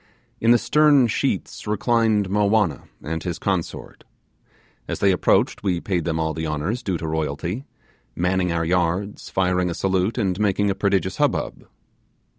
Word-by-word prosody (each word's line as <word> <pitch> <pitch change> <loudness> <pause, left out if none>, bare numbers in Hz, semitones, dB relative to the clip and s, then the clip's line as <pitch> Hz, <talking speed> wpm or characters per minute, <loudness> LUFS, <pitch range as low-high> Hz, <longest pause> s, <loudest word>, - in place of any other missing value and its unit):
In 115 - +1
the 120 - +7
stern 150 0 +4
sheets 110 - -2
reclined 110 -1 +2
Mowanna 105 -2 +1 0.2
and 80 +1 -3
his 85 0 -4
consort. 95 -2 -3 0.8
As - - -3
they 100 - +3
approached, 90 - +2
we 90 -4 0
paid 90 -3 -2
them 80 -1 -1
all 80 0 -1
the 80 +1 -3
honours 80 +11 -2
due 95 -3 -2
to 80 - -5
royalty; 80 - -3 0.5
manning 90 0 0
our 85 0 0
yards, 90 +4 -1
firing 90 -1 +1
a 85 - -3
salute, 95 +3 0
and 95 -5 0
making 100 -1 +1
a - - +1
prodigious 95 -1 0
hubbub. - - -1
95 Hz, 155 wpm, -22 LUFS, 85-105 Hz, 0.8 s, the